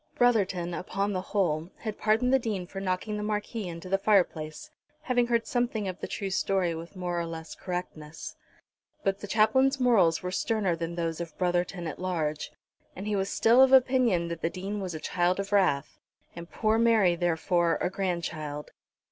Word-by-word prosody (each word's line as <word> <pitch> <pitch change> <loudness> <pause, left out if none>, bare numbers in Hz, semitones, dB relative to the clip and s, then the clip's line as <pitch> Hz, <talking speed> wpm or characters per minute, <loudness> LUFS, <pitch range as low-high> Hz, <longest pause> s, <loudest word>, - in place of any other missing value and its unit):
Brotherton, 195 -8 +2
upon 195 +3 -2
the 185 - -1
whole, 175 -5 -1
had 215 -2 -6
pardoned 225 +4 +2
the 265 - +5
Dean 210 -7 -3
for 195 +2 -7
knocking 195 +3 -2
the - - -3
Marquis 210 0 -3
into 170 +1 -7
the 195 +1 +1
fireplace, 175 -7 +1 0.3
having 245 -4 +2
heard 235 -1 +1
something 240 -4 -1
of 185 0 -5
the - - -4
true 195 -1 -4
story 190 -2 +1
with 165 +4 -8
more 175 -1 -2
or 170 - -2
less 160 -1 -7
correctness. 160 -4 -6 0.7
But 195 0 0
the 205 - -7
Chaplain's 260 +6 +3
morals 195 -11 +3
were 180 - -3
sterner 195 -2 0
than 165 +1 -4
those 165 -1 -2
of 165 -3 -7
Brotherton 175 0 0
at 155 - -5
large, 160 -5 -2 0.4
and 190 - -6
he 210 -1 0
was 195 0 0
still 235 +3 +5
of 265 0 +6
opinion 250 -9 +4
that 170 -1 -5
the 165 - +1
Dean 195 +4 -5
was 180 -3 -4
a - - -4
child 180 +3 0
of 200 0 -4
wrath, 180 -9 +1 0.4
and 170 0 -8
poor 220 0 +1
Mary, 220 -6 +4
therefore, 170 -1 +1
a 180 - -1
grandchild. 160 -6 -3
185 Hz, 185 wpm, -28 LUFS, 170-215 Hz, 0.7 s, of